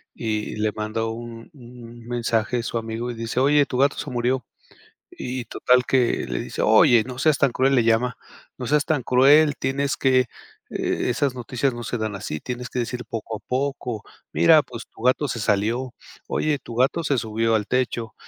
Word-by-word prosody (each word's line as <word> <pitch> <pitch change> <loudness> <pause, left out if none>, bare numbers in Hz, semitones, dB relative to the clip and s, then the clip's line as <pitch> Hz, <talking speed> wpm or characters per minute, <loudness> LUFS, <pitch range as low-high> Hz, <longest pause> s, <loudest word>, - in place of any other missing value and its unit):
y 110 -2 -3
le 105 0 0
mandó 110 +1 -3
un 115 +1 -9
un 120 -3 -13
mensaje 120 0 -1
su 115 - -2
amigo 115 +2 -4
y - - -5
dice: 115 +1 -3
"Oye, 145 +1 +4
tu 125 - -3
gato 140 +2 +3
se 150 - -5
murió". 125 +1 0 0.7
Y 125 0 -5
total 125 0 +2
que 125 -3 +1
le - - -3
dice: - - -6
"Oye, 120 -2 +6
no 130 0 -8
seas 150 +1 +3
tan 140 - +3
cruel", 135 +2 +2
le 120 - +3
llama. 115 +2 +2 0.4
"No 125 - -5
seas 150 +2 +2
tan 150 -4 0
cruel, 145 +4 +5
tienes 140 +1 -1
que, 130 -1 +3
eh, 125 - 0 0.4
e - - -1
esas 135 +1 0
noticias 125 +2 -1
no 120 0 -6
se 120 - -3
dan 110 -1 -3
así. 85 -6 -5
Tienes 125 0 -5
que 125 - -3
decir 120 +1 -4
poco 110 -1 -5
a - - -11
poco. 125 -4 -2 0.3
Mira, 160 -2 +6
pues, 120 -3 -9
tu - - -14
gato 130 +4 +2
se 120 - -3
salió. 115 +5 0 0.3
Oye, 150 -2 0
tu 120 -3 -10
gato 135 +7 +1
se 145 -2 +1
subió 115 0 0
al 105 -2 0
techo. 120 -3 -1
125 Hz, 195 wpm, -23 LUFS, 115-130 Hz, 0.7 s, Oye